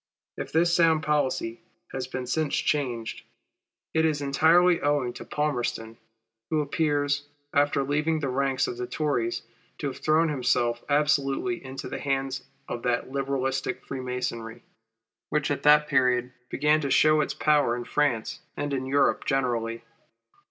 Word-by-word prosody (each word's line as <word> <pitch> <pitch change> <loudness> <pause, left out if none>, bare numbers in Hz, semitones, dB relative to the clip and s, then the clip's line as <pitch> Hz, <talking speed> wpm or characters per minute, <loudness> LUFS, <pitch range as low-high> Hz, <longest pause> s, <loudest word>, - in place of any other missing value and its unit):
If - - -6
this 170 +2 +3
sound 165 -2 +4
policy 135 -6 0 0.3
has 130 -1 -4
been 130 -1 -4
since 150 +3 0
changed, 125 -6 -1 0.7
it 160 - +3
is 155 -2 +1
entirely 165 +5 +4
owing 145 -4 +1
to - - -8
Palmerston, 120 -6 -2 0.5
who 155 - +1
appears, 145 -1 0 0.3
after 145 -1 +2
leaving 150 +3 0
the 145 - -2
ranks 135 0 +1
of 120 - -5
the 125 0 -4
Tories, 125 -4 -1 0.3
to - - -5
have 130 - -9
thrown 155 +1 +3
himself 120 -4 0
absolutely 150 +4 +1
into 135 0 -7
the - - -5
hands 135 -1 -1 0.3
of 120 - -4
that 125 +1 -1
Liberalistic 135 -1 -2
Freemasonry, 125 -3 -4 0.7
which, 150 -1 0
at 145 - -1
the 150 0 +6
period, 125 -2 +2 0.2
began 150 +1 +2
to 140 - -2
show 155 +2 +5
its - - -2
power 145 -6 +3
in 120 - -4
France 125 -5 0 0.2
and 145 -1 -2
in 130 -1 -2
Europe 140 +1 +2
generally. 115 -4 -1
140 Hz, 145 wpm, -26 LUFS, 125-150 Hz, 0.7 s, the